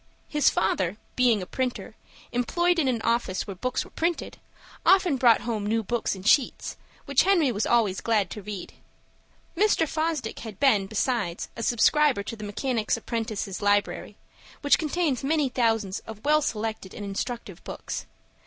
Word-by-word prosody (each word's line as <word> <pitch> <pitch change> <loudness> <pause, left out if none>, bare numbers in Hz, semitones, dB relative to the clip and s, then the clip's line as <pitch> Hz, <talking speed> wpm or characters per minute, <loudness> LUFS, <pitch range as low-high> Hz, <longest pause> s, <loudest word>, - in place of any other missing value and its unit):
His 295 -2 +3
father, 190 0 0 0.2
being 235 -6 +3
a - - -6
printer, 255 +5 -3 0.4
employed 345 +9 +1
in 290 - +2
an 235 -4 0
office 230 -5 0
where 200 - -6
books 250 +7 -2
were - - -15
printed, 340 +1 -2 0.4
often 370 -6 +4
brought 240 -3 +5
home 225 -3 -2
new 225 +1 +1
books 235 0 -1
in 190 - -10
sheets, 250 +5 +2 0.3
which 280 -2 +4
Henry 345 -8 +3
was 210 -1 -1
always 220 -6 +2
glad 210 -6 +1
to 210 - -6
read. 200 -2 -7 0.8
Mr. 390 -3 +3
Fosdick 310 -7 -2
had 220 -4 -9
been, 215 -9 +4
besides, 215 -4 -1
a - - -6
subscriber 245 +1 +3
to 230 - -6
the 215 - -9
Mechanics' 225 +2 -1
Apprentices' 220 -4 -4
Library, 205 0 0 0.4
which 285 - +4
contains 310 -4 0
many 295 -1 +1
thousands 225 -6 0
of 220 +1 -9
well 305 +1 +4
selected 220 -6 -3
and 205 - -6
instructive 200 -1 -5
books. - - -6
230 Hz, 160 wpm, -26 LUFS, 205-280 Hz, 0.8 s, brought